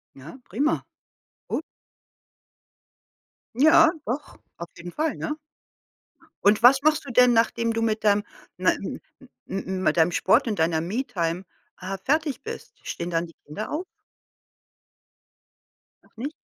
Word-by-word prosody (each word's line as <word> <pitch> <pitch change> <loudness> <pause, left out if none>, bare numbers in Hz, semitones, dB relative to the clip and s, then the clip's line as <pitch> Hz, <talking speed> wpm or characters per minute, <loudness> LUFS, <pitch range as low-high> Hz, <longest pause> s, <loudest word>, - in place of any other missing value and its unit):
Ja, 150 - -11
prima. 285 - +1 0.7
Gut. - - -2 1.9
Ja, 315 +4 +6
doch, 275 +5 -4 0.2
auf 170 0 -7
jeden 175 +1 -8
Fall, 310 - -1
ne? 305 0 -4 1.1
Und 210 +3 +4
was 265 +2 +7
machst 310 -1 +3
du 270 - -6
denn, 250 0 +6
nachdem 230 0 +2
du 225 - -1
mit 220 -1 0
dem 205 0 +3 0.3
ne - - +3
m - - -6 0.2
m - - -16 0.2
m 195 - -3
m 190 0 -2
mit 155 -1 +2
deinem 165 +2 +4
Sport 230 +9 +3
und 210 -6 -2
deiner 160 0 +2
Me-Time, 180 -4 -2 0.4
äh, 190 +1 -4
fertig 300 -1 0
bist? 455 +1 -8
Stehen 170 +1 -4
dann 165 0 0
die 165 - -16
Kinder 180 +9 -6
auf? 320 +5 -2 2.2
Noch - - -29
nicht? 280 +7 -4
225 Hz, 140 wpm, -25 LUFS, 175-275 Hz, 2.2 s, was